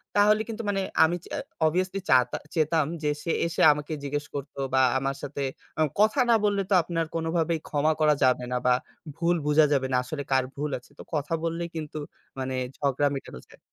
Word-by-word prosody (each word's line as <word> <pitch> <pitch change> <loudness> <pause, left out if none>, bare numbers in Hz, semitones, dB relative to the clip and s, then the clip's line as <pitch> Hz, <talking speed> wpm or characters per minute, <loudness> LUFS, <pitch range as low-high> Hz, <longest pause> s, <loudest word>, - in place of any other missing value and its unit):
তাহলে 210 +1 +5
কিন্তু 230 0 -5
মানে 195 -1 0 0.2
আমি 165 +2 +3
চা - - -6 0.3
অবভিয়াসলি 185 +4 0
চাতা 125 -1 +4 0.2
চাইতাম 155 -1 +2 0.2
যে 150 - +2
সে 165 - -1 0.2
এসে 165 - -2
আমাকে 150 +2 -5
জিজ্ঞেস 145 +1 -2
করত 140 0 -6 0.2
বা 130 - +5 0.2
আমার 135 0 -2
সাথে 140 0 -5 0.4
আ - - +3 0.2
কথা 215 +6 +4
না 230 - +6
বললে 200 -1 +2
তো - - +2
আপনার 165 -1 -1
কোনভাবেই 165 0 0
ক্ষমা 155 +1 +2
করা 150 -1 +4
যাবে 125 -1 +3
না 125 - +1
বা 125 - +5 0.4
ভুল 175 +1 +1
বুঝা 150 +1 +5
যাবে 135 -1 +1
না। - - +2
আসলে 140 +3 -5
কার 130 -1 +4
ভুল 150 +1 -2
আছে 125 - -23
তো - - -7
কথা 150 +2 -2
বললেই 170 +1 -2
কিন্তু 155 -1 -5 0.4
মানে 130 0 -2 0.2
ঝগড়া 140 0 +1
মেটানো 65 - -7
যায়। - - -18
155 Hz, 195 wpm, -26 LUFS, 140-170 Hz, 0.4 s, না